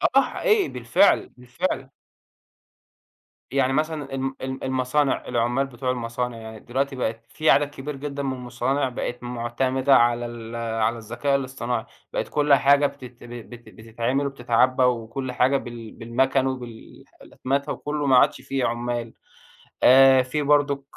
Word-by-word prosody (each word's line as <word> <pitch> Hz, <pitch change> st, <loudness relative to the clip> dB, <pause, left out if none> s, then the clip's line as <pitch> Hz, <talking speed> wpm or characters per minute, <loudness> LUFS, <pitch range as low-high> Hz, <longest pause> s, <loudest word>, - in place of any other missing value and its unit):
آه، 275 Hz, -, +8 dB
حقيقي 415 Hz, -, +1 dB
بالفعل، 125 Hz, +12 st, +2 dB
بالفعل. 130 Hz, +3 st, -3 dB, 1.6 s
يعني 135 Hz, -1 st, +1 dB
مثلًا 150 Hz, -2 st, -2 dB
ال 135 Hz, 0 st, -2 dB
ال 130 Hz, 0 st, -5 dB
المصانع، 130 Hz, +2 st, 0 dB
العمال 120 Hz, +2 st, 0 dB
بتوع 125 Hz, 0 st, -3 dB
المصانع 120 Hz, 0 st, -3 dB
يعني 110 Hz, -1 st, -9 dB
دلوقتي 135 Hz, +2 st, -2 dB
بقت 115 Hz, -2 st, -3 dB
في 155 Hz, -, 0 dB
عدد 145 Hz, 0 st, +4 dB
كبير 145 Hz, 0 st, -7 dB
جدًا 140 Hz, 0 st, -5 dB
من 135 Hz, -1 st, -1 dB
المصانع 130 Hz, +2 st, -1 dB
بقت 125 Hz, 0 st, -5 dB
معتمدة 130 Hz, +3 st, +1 dB
على 120 Hz, 0 st, +3 dB
ال 120 Hz, -1 st, -8 dB
على 115 Hz, 0 st, -1 dB
الذكاء 120 Hz, +5 st, -1 dB
الاصطناعي، 125 Hz, -3 st, -3 dB, 0.3 s
بقت -, -, -2 dB
كل 145 Hz, -1 st, +2 dB
حاجة 140 Hz, +1 st, +5 dB
بتت 125 Hz, -4 st, -12 dB
بت 120 Hz, 0 st, -10 dB
بتتعمل 115 Hz, +5 st, -2 dB
وبتتعبى 130 Hz, -1 st, +2 dB
وكل 125 Hz, +1 st, -1 dB
حاجة 130 Hz, +3 st, +2 dB
بال 120 Hz, -3 st, -8 dB
بالمكن 130 Hz, +3 st, 0 dB
وبالح 120 Hz, -4 st, -8 dB
وبالأتمتة 140 Hz, +2 st, -3 dB
وكله 150 Hz, 0 st, -3 dB
ما 130 Hz, -2 st, +5 dB
عادش -, -, +3 dB
في 135 Hz, 0 st, -2 dB
عمال، 120 Hz, -1 st, -2 dB, 0.7 s
آآ، 130 Hz, 0 st, +7 dB
في 145 Hz, +4 st, -2 dB
برضك 145 Hz, -1 st, +2 dB
130 Hz, 140 wpm, -24 LUFS, 120-140 Hz, 1.6 s, آه